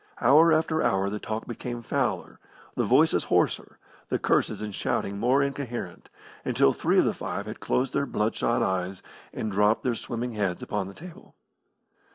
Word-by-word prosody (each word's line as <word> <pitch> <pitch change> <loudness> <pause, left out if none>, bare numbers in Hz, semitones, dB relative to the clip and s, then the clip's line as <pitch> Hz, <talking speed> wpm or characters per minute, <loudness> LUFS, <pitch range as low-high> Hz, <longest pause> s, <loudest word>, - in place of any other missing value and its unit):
Hour 155 +7 +6
after 160 0 +2
hour 95 +1 +1
the 105 - -3
talk 110 +1 -4
became 120 0 -6
fouler, 120 -9 -2 0.3
the - - 0
voices - - +3
hoarser, - - 0 0.3
the - - +1
curses - - +1
and 105 -1 -5
shoutings 100 - -1
more 130 +5 +3
incoherent, 130 -9 -5 0.3
until 70 - +3
three - - +1
of - - +5
the - - +1
five 100 - -4
had 110 +1 -7
closed 125 +1 0
their 140 - 0
blood 105 -1 0
shot 115 - +1
eyes, 95 0 -2 0.3
and 110 - -4
dropped 105 +3 +2
their 125 - +1
swimming 120 +1 -4
heads 100 -4 -2
upon 105 -3 -2
the 100 - -10
table. 175 0 -13
115 Hz, 175 wpm, -27 LUFS, 100-130 Hz, 0.3 s, Hour